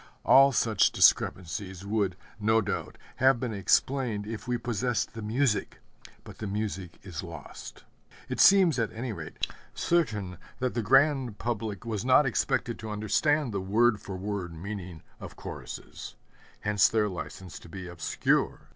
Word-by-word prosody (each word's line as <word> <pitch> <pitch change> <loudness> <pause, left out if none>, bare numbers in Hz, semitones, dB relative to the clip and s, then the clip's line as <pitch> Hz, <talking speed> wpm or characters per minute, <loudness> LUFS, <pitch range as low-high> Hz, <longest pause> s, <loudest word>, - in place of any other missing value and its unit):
All 135 +1 +7
such 110 -5 +3
discrepancies 95 +1 +2
would, 100 -3 0 0.2
no 110 +1 +3
doubt, 95 -6 -3 0.2
have 130 -1 +4
been 120 -3 -3
explained 105 +2 +1
if 110 +1 -7
we 125 0 0
possessed 120 0 -1
the 115 - -7
music; 110 +1 0 0.5
but - - -12
the 110 - -4
music 95 -4 -4
is 90 -6 -6
lost. 85 -5 -10 0.4
It - - -4
seems, 185 -9 +6
at 110 -2 0
any 115 +1 -4
rate, 80 -5 -4 0.3
certain 105 - 0 0.2
that 130 -1 -1
the 120 - -1
grand 135 -1 +3
public 115 -3 -3
was 110 -3 -3
not 130 +3 +5
expected 120 -1 0
to 110 - -6
understand 120 +7 +1
the 100 - -1
word 110 +3 +2
for 95 -1 -6
word 95 -3 -4
meaning 90 -2 -7 0.2
of - - -9
choruses; - - -8 0.5
hence 105 -1 +3
their 110 -1 +2
license 90 -1 -7
to - - -14
be 95 +1 -7
obscure. 85 -4 -1
105 Hz, 150 wpm, -28 LUFS, 95-120 Hz, 0.5 s, All